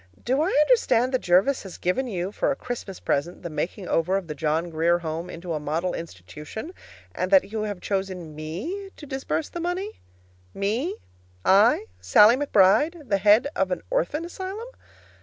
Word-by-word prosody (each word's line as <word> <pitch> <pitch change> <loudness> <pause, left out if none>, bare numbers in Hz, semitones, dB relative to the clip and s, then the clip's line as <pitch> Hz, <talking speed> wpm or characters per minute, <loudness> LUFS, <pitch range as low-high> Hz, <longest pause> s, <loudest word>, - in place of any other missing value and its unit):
Do 260 +4 +2
I 320 - +2
understand 300 - +3
that 255 - +1
Jervis 190 +10 +3
has 190 -3 -9
given 255 +9 0
you, 185 -3 -3
for - - 0
a 280 - +1
Christmas 240 -8 -6
present, 170 +7 -2
the 170 - -5
making 175 +5 -4
over 180 +4 +1
of 195 - -4
the 155 - -5
John 160 +3 -1
Grier 165 +2 +2
Home 165 +1 -5
into 170 0 -6
a 155 - -2
model 160 +5 -2
institution, 150 - -8 0.4
and 185 - -2
that 195 +1 +4
you 220 -1 -2
have 205 -4 -5
chosen 190 -5 -3
me 195 - -5
to 295 - -10
disburse 265 - -3
the 345 - -6
money? 360 +5 -3 0.6
Me 235 - -1 0.5
I, 235 - +5
Sallie 215 +3 +6
McBride, 290 - +3
the 200 - +2
head 210 +6 +5
of - - +1
an - - -3
orphan 335 -10 0
asylum! 385 +6 -6
200 Hz, 175 wpm, -25 LUFS, 170-285 Hz, 0.6 s, Sallie